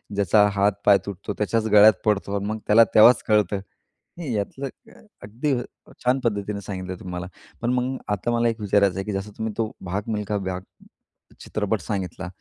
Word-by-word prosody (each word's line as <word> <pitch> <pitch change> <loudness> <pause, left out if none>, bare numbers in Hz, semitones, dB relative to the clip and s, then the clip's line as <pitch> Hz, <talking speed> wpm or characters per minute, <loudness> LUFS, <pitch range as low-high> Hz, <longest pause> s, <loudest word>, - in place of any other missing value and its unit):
"ज्याचा 105 +1 +4
हात, 100 +1 +3
पाय 100 -1 +7
तुटतो 100 +1 -5
त्याच्याच 110 +1 0
गळ्यात 105 +1 +8
पडतो 100 -2 0
आणि 100 0 -2
मग 110 +1 -2
त्याला 110 +2 +7
तेव्हाच 115 +3 +7
कळतं." 105 -2 +2 0.6
नाही 155 -8 -4
यातलं 105 +7 -3 0.3
अ, - - -18 0.2
अगदी 115 +9 -2
अ, 120 - -3 0.4
छान 125 +2 +2
पद्धतीने 100 -2 -2
सांगितलं 95 -2 -6
तुम्ही 90 - -8
मला. 90 -1 -4 0.3
पण 120 - 0
मग 125 +1 -1 0.2
आता 105 +4 -2
मला 120 0 +2
एक 115 0 -4
विचारायचं 100 -2 +2
आहे, 95 - -2
की 105 - -3
जसं 100 +2 -4
तुम्ही 110 -1 -3
तो 110 -2 -1
भाग 95 +2 -3
मिल्खा 105 -1 -2
भाग 95 -2 -4 0.8
चित्रपट 105 0 -2
सांगितला. 95 -3 -4
105 Hz, 185 wpm, -24 LUFS, 100-110 Hz, 0.8 s, गळ्यात